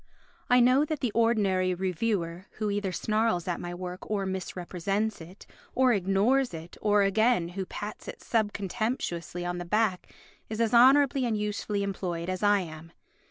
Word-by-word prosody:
I 250 0 +6
know 255 +4 +5
that 305 -1 -3
the 250 -5 0
ordinary 200 -5 +2
reviewer 185 -1 -2
who 215 -1 -2
either 200 -2 -1
snarls 215 -2 0
at 175 - -2
my 175 0 -5
work 180 0 -7
or 205 -2 -1
misrepresents 190 +2 -3
it 180 +4 -12 0.3
or 255 -1 +4
ignores 200 +5 +2
it 165 +2 -9
or, 205 -1 +3
again, 200 -2 +2
who 185 +1 -5
pats 210 +1 -7
it - - -7
sub 220 -3 +1
contemptuously 195 -4 -3
on 175 0 -3
the - - -4
back 205 0 0 0.4
is 220 0 -4
as 230 -1 +1
honourably 265 +2 +6
and 220 -2 0
usefully 210 -1 -2
employed 180 -3 -3
as 185 -1 -3
I 205 -1 +4
am. 160 -1 -9
200 Hz, 165 wpm, -28 LUFS, 180-225 Hz, 0.4 s, I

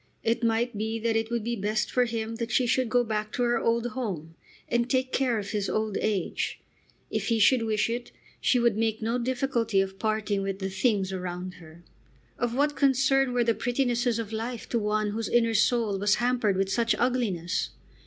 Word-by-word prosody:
It 230 +1 0
might 230 +1 +1
be 220 +2 -2
that 225 0 0
it 225 0 0
would 235 -2 -1
be 235 +1 -1
best 215 +1 -1
for 250 -1 +3
him 225 -1 -3
that 230 0 -3
she 255 - +3
should 255 0 +1
go 245 +1 +3
back 215 -2 -2
to 245 - 0
her 240 0 +2
old 230 0 +1
home, 190 -11 -4 0.3
and 235 +1 0
take 260 -1 +1
care 255 -4 +1
of 200 -1 -4
his 205 -2 -1
old 215 -2 -1
age. 205 -5 -1 0.5
If - - -1
he 230 - +2
should 230 +3 +5
wish 215 -2 +1
it, 240 +1 -4 0.3
she 255 - +3
would 235 -3 +3
make 220 0 -1
no 230 +3 0
difficulty 240 -4 0
of 195 0 -2
parting 215 -2 0
with 195 0 -2
the 190 -1 -4
things 195 -2 +1
around 180 0 -4
her. 165 +1 -14 0.6
Of 240 -1 -1
what 290 +2 +1
concern 270 -1 +3
were 245 -1 +2
the 230 0 +2
prettinesses 245 -1 0
of 225 -1 -4
life 230 +2 -4
to 235 - +1
one 210 0 0
whose 225 +1 -3
inner 230 -1 +3
soul 215 -2 +2
was 205 +1 +3
hampered 240 -5 +1
with 195 0 0
such 230 0 +2
ugliness? 225 -9 0
225 Hz, 205 wpm, -27 LUFS, 210-245 Hz, 0.6 s, should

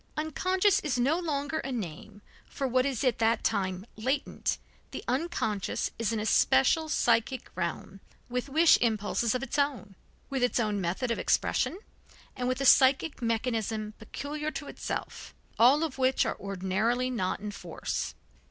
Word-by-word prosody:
Unconscious 370 +6 +2
is 295 - -1
no 275 +8 +2
longer 295 -2 -2
a 270 - -4
name 205 -1 -6 0.3
for 270 - -2
what 255 +1 +2
is 265 -3 -2
at 250 -4 +1
that 225 0 +2
time 190 -2 -1
latent, 260 +6 -1 0.3
the - - -7
unconscious 250 - -1
is 230 -2 0
an 225 - -1
especial 220 - +3
psychic 255 -3 +1
realm 175 +2 -4 0.3
with 250 +2 -3
wish 320 +4 +5
impulses 225 0 +1
of 255 - -2
its 270 +2 -2
own, 255 -9 -1 0.3
with 270 -2 -2
its 245 0 +2
own 210 -3 0
method 190 +8 -1
of 230 - -1
expression - - +1 0.6
and 250 - -2
with 255 0 0
a 275 - -1
psychic 270 +3 +5
mechanism 225 -2 -1
peculiar 295 +7 -5
to 295 -1 -6
itself, - - -6 0.2
all 265 +7 +6
of 290 -4 -4
which 260 0 +3
ordinarily 200 +6 -1
are 255 - -3
not 185 -4 -1
in 210 0 -5
force. 180 -4 -4
245 Hz, 155 wpm, -29 LUFS, 215-280 Hz, 0.6 s, all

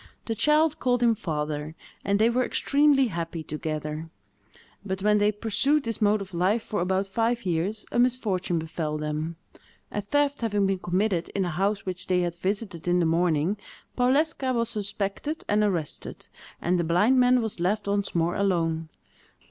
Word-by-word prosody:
The 225 - -1
child 300 +6 +3
called 245 -1 +1
him 235 -1 +5
father, 150 -4 -3 0.3
and 200 0 +2
they 220 +2 +4
were 245 +2 +2
extremely 280 0 +3
happy 165 -2 -4
together. 155 +1 -4 0.7
But 190 -1 -4
when 210 0 +4
they 205 - +3
had 210 0 -2
pursued 275 +7 +2
this 230 -2 -4
mode 210 0 +3
of 190 -1 -8
life 190 +6 +1
for 205 - -2
about 190 +2 +1
five 230 +4 -1
years, 185 +5 0
a - - 0
misfortune 210 -8 +1
befell 160 -1 -3
them. 150 +2 -3 0.6
A 210 - -2
theft 285 +6 0
having 205 -3 +1
been 195 -1 0
committed 180 0 0
in 195 -2 +1
a 175 - -2
house 195 +4 -1
which 185 -1 -4
they 180 -1 +2
had 175 -1 -1
visited 190 -2 -3
in 175 0 +3
the 170 - +2
morning, 165 +2 +1 0.4
Powleska 265 +1 +2
was 230 -1 +1
suspected 210 +7 -3
and 210 +1 +2
arrested, 175 -8 -3 0.3
and 175 +1 +1
the - - +1
blind 195 +11 +3
man 250 0 +5
was 220 -6 -3
left 200 +4 0
once 200 -1 -1
more 170 +1 +2
alone. 165 -5 0
200 Hz, 175 wpm, -26 LUFS, 170-230 Hz, 0.7 s, him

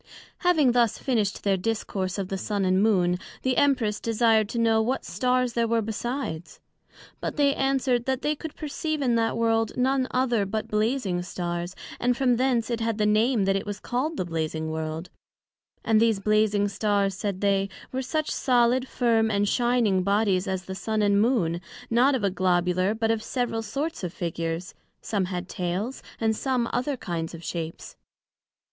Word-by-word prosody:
Having 320 -8 +4
thus 235 -2 +2
finished 220 -7 -1
their 195 -1 +2
discourse 195 -2 -2
of 195 -2 -3
the 195 - -2
Sun 200 0 -1
and 185 +1 +3
Moon, 180 -5 +2 0.2
the 260 -1 +1
Empress 240 -7 +2
desired 225 -2 +2
to 235 - -4
know 225 -1 +3
what 250 +4 -1
Stars 250 -1 0
there 235 0 +1
were 230 0 +1
besides? 220 - -4 0.6
But - - -4
they 285 -1 +4
answer'd, 265 -3 +1
that 265 0 -1
they 300 +1 +1
could 315 +1 -8
perceive 305 0 -3
in 245 -3 +2
that 230 0 +1
World 225 -1 +1
none 260 +1 +2
other 245 -4 +1
but 215 +2 -3
Blazing 215 -4 0
Stars, 175 0 -4 0.2
and 245 0 +1
from 250 -2 +2
thence 245 -2 +1
it 235 - -1
had 225 -1 -1
the 210 - +1
name 215 +1 +3
that 195 0 +2
it 195 +1 -2
was 205 0 -4
called 285 +9 -2
the - - -1
Blazing 160 -1 -3
World; 160 +2 -4 0.7
and 220 -1 +4
these 225 -3 +3
Blazing 210 0 +2
Stars, 200 -1 0
said 195 -1 -3
they, 195 -1 +2 0.2
were 260 - -2
such 300 +4 -2
solid, 250 0 +2
firm 230 -3 +2
and 205 -1 +1
shining 240 -5 +2
bodies 200 0 +1
as 190 -1 -2
the 190 - -5
Sun 215 +2 -1
and 200 0 +3
Moon, 185 -8 +1 0.3
not 255 +4 +4
of 240 - -2
a 200 - +2
Globular, 185 +1 +1
but 225 0 +1
of 225 -1 0
several 240 -2 -2
sorts 280 - -4
of 175 - -2
figures: 165 0 -4 0.3
some 200 -4 -1
had 180 -1 -4
tails; 185 +8 -3 0.2
and 220 -1 +1
some, 255 -1 0
other 260 +3 -1
kinds 170 -5 -4
of 165 - -11
shapes. 165 -1 -6
220 Hz, 180 wpm, -26 LUFS, 190-245 Hz, 0.7 s, Having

